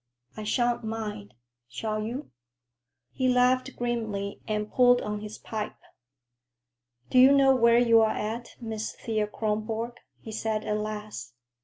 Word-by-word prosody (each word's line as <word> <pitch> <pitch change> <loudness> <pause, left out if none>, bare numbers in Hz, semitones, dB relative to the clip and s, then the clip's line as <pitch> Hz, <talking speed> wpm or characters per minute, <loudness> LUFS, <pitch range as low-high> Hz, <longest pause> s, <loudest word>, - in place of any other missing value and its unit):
"I 215 - -6
shan't 240 +2 +1
mind. 215 - -5 0.3
Shall 215 - -3
you?" 240 +7 -5 0.8
He 260 -1 0
laughed 255 +1 +3
grimly 220 -5 -3
and 210 -1 -2
pulled 245 -1 +5
on 210 0 -3
his 210 0 -7
pipe. 215 -1 -5 1.3
"Do 255 - +5
you 260 +2 +8
know 270 -1 +6
where 235 -1 +5
you're 230 -2 +5
at, 225 +3 -4
Miss 220 -2 -4
Thea 215 -2 -2
Kronborg?" 220 +2 -2 0.2
he 220 - -9
said 220 0 -2
at 210 - 0
last. 210 - -6
220 Hz, 135 wpm, -27 LUFS, 210-240 Hz, 1.3 s, you